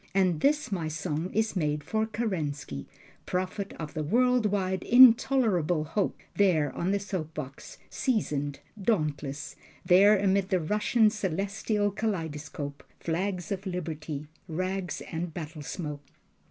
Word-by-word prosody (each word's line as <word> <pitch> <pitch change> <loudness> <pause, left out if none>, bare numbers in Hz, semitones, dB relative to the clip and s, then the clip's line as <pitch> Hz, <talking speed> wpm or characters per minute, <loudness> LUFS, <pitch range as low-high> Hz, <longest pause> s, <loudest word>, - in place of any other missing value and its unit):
And 185 -5 +3
this 295 - +2
my 170 -5 -1
song 160 +2 -3
is 220 +1 0
made 150 -4 0
for 220 0 0
Kerensky, 150 - -3 0.4
Prophet 185 +2 -2
of 155 -2 -6
the 155 - -2
world 245 +7 +3
wide 190 -2 0
intolerable 230 - +5
hope, 185 +6 -1 0.2
There 160 -9 +3
on 175 - -1
the 200 +1 +2
soap 185 -6 -4
box, 135 -2 -7
seasoned, 145 - -1 0.2
dauntless, 150 -8 -1 0.3
There 200 +4 +7
amid 195 0 +2
the 185 -2 +2
Russian 210 +5 +3
celestial 205 +1 -1
kaleidoscope, 160 -8 -4 0.2
Flags 180 +1 -2
of 195 0 -3
liberty, 155 -5 -4 0.2
rags 185 +1 -3
and 170 +1 -4
battlesmoke. 150 -2 -5
185 Hz, 125 wpm, -28 LUFS, 155-205 Hz, 0.4 s, There